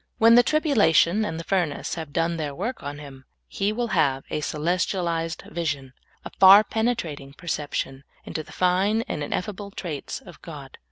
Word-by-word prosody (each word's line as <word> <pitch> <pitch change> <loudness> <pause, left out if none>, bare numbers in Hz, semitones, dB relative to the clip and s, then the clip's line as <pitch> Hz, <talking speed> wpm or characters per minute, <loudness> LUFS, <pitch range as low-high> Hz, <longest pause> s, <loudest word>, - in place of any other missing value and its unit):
When 230 +1 +6
the 240 - +8
tribulation 220 - +3
and 165 -6 -3
the - - -5
furnace 175 -6 -1
have 160 -4 -6
done 165 +2 0
their 145 -3 -4
work 235 - -4
on 145 +1 -6
him, 135 -3 -11 0.2
he 200 - -1
will 235 +2 -2
have 135 -7 +1
a 150 - -2
celestialized 170 +1 -1
vision, 150 -6 -3 0.3
a - - -7
far 195 +2 +9
penetrating 175 - -2
perception, 145 -4 -4 0.2
into 155 - -4
the - - -14
fine 190 +5 +1
and 150 - -5
ineffable 200 +6 -4
traits 170 -7 -6
of - - -15
God. - - -10
170 Hz, 165 wpm, -24 LUFS, 150-205 Hz, 0.3 s, far